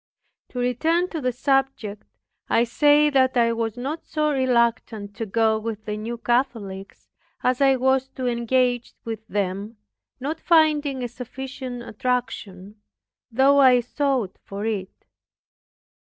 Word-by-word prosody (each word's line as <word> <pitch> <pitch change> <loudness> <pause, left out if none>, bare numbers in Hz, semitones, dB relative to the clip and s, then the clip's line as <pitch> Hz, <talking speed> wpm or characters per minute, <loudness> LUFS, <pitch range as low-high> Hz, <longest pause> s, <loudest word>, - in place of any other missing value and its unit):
To - - -10
return 320 +9 +1
to 320 - -4
the 255 -1 0
subject, 265 -5 -1 0.4
I 230 - +4
say 295 +5 +4
that 260 -2 +3
I 230 -1 +3
was 230 0 -2
not 280 +6 -4
so 305 -1 0
reluctant 235 -5 0
to 225 - -3
go 220 +1 +2
with 220 -1 -5
the 210 - -3
New 225 +3 -5
Catholics, 225 -6 -2 0.4
as 255 +1 +1
I 270 -1 +5
was 265 +1 +2
to 260 - -4
engage 245 0 0
with 220 -1 -6
them, 200 +2 -3 0.4
not 300 +5 -3
finding 300 -5 +3
a - - -1
sufficient 250 0 -7
attraction, 215 -4 -4 0.5
though 270 +4 +4
I 255 -2 +7
sought 250 -4 -1
for 200 +2 -6
it. 200 -4 -4
245 Hz, 135 wpm, -23 LUFS, 220-270 Hz, 0.5 s, I